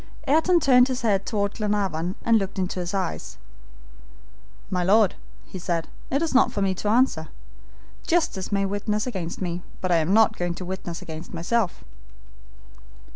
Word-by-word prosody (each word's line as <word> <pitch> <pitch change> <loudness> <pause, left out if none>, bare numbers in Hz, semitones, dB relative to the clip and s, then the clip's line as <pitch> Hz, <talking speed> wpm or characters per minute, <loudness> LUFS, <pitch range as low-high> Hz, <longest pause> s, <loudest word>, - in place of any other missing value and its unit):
Ayrton 320 +5 +4
turned 255 -4 +5
his 255 -2 -3
head 200 -3 +1
toward 205 -2 -1
Glenarvan, 195 -5 -1
and 230 -1 +5
looked 195 0 -4
into 185 0 -2
his 175 0 -3
eyes. 190 - -3 1.3
"My 180 -1 0
Lord," 200 +1 +4 0.3
he 185 - -8
said, 170 -2 -2 0.2
"it 280 +4 +1
is 325 - -1
not 265 - +4
for - - -3
me 190 -1 +1
to 205 +3 -3
answer. 220 -9 +2 0.8
Justice 315 - 0
may 200 -1 +1
witness 210 +2 -1
against 190 -7 -4
me, 175 0 -3 0.2
but 185 - -2
I 170 - +5
am 160 +2 +1
not 220 +1 +4
going 175 -1 -2
to 185 - -7
witness 175 -2 -5
against 160 +2 -8
myself." 190 +4 -1
195 Hz, 165 wpm, -24 LUFS, 180-225 Hz, 1.3 s, turned